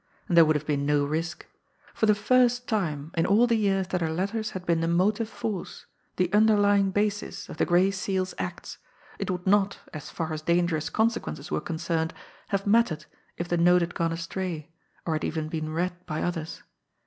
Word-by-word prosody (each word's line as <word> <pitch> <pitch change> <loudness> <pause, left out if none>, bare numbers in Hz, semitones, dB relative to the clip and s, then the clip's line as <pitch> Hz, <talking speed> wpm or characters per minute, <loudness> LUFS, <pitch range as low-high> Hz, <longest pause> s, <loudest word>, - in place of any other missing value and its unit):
And 180 - 0
there 165 -1 +8
would 155 0 +2
have 150 0 -2
been 145 -2 0
no 145 0 +2
risk. 160 +3 -3 0.5
For 220 - +1
the 210 - +5
first 245 +3 +3
time 160 - -2
in 165 - +2
all 210 +5 +5
the 240 - +1
years 195 -4 +1
that 180 - -1
her 165 - 0
letters 200 +7 -2
had 180 - -10
been 170 -2 +2
the 165 - 0
motive 205 +6 +1
force, 210 -5 -5 0.3
the 185 +1 0
underlying 205 -2 +4
basis 205 +1 -2
of - - -8
the - - +1
Gray 180 +2 +4
Seal's 190 -1 -2
acts, - - -5 0.4
it - - -3
would 180 -1 -3
not, 195 0 +3 0.2
as 155 - -7
far 160 -2 -3
as 155 - -4
dangerous 170 -1 +1
consequences 220 -9 -1
were - - 0
concerned, 165 0 -2 0.3
have 200 -1 -1
mattered 200 -8 +2 0.3
if 175 - -3
the 175 - 0
note 175 +1 +5
had 170 +1 -2
gone 165 -1 0
astray, 165 -1 -4 0.3
or 165 - 0
had 155 - -2
even 155 -1 -2
been 155 -1 -3
read 180 +2 -2
by 155 -2 -2
others. 165 -2 -4
180 Hz, 195 wpm, -27 LUFS, 160-205 Hz, 0.5 s, there